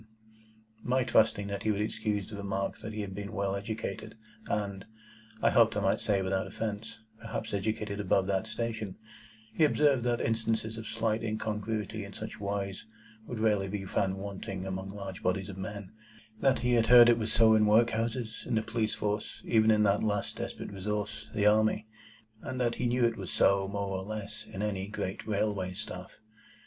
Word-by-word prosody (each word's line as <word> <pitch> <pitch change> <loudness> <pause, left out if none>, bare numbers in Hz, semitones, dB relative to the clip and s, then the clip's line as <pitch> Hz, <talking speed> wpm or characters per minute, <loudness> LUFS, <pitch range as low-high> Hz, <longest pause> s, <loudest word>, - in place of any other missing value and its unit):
On - - -7
my 130 +1 +3
trusting 110 -4 +3
that 100 0 -3
he 110 - 0
would 100 - -1
excuse 105 -1 -1
the 105 - -8
remark 100 -1 -2
that 110 - -6
he 110 0 -4
had 100 -2 -5
been 100 +2 -6
well 100 -1 0
educated, 110 +1 -5 0.3
and 100 -2 -2 0.6
(I - - +5
hoped - - +5
I - - +3
might - - +2
say 100 -2 +1
without 95 0 0
offence) 110 0 -4 0.2
perhaps 115 -1 -4
educated 105 0 -2
above 95 -1 +2
that 95 +2 0
station, 110 -3 -3 0.6
he 160 - +2
observed 145 -4 +4
that 120 -1 +1
instances 110 0 0
of 110 - -7
slight 110 -1 0
incongruity 110 0 -2
in 100 0 -9
such 110 - -7
wise 100 -1 -3 0.4
would 120 - -4
rarely 105 -3 +2
be 95 0 -4
found 95 0 0
wanting 95 -1 -5
among 95 0 -4
large 95 -2 -7
bodies 95 +2 0
of 95 - -7
men; 100 0 -6 0.5
that 135 -1 +4
he 125 - +3
had 115 -1 +4
heard 120 -1 +10
it 120 -1 +5
was 110 0 -1
so 110 0 +6
in 110 -1 +5
workhouses, 115 +1 +2
in - - 0
the 110 - +2
police 110 -1 -1
force, 105 0 -2
even 110 -1 +4
in 105 -1 +5
that 100 0 +3
last 105 -2 -1
desperate - - -5
resource, 105 +2 -3
the 105 - +2
army; 110 0 +4 0.6
and 130 - -5
that 120 -2 +2
he 125 - +2
knew 120 0 +3
it 115 -1 +1
was 95 -6 -5
so, 95 +4 +3
more 100 -1 -2
or - - -5
less, 105 +1 -6
in 95 - -4
any 100 -2 -2
great 100 -1 -4
railway 100 -3 0
staff. - - -7
105 Hz, 190 wpm, -30 LUFS, 100-110 Hz, 0.6 s, heard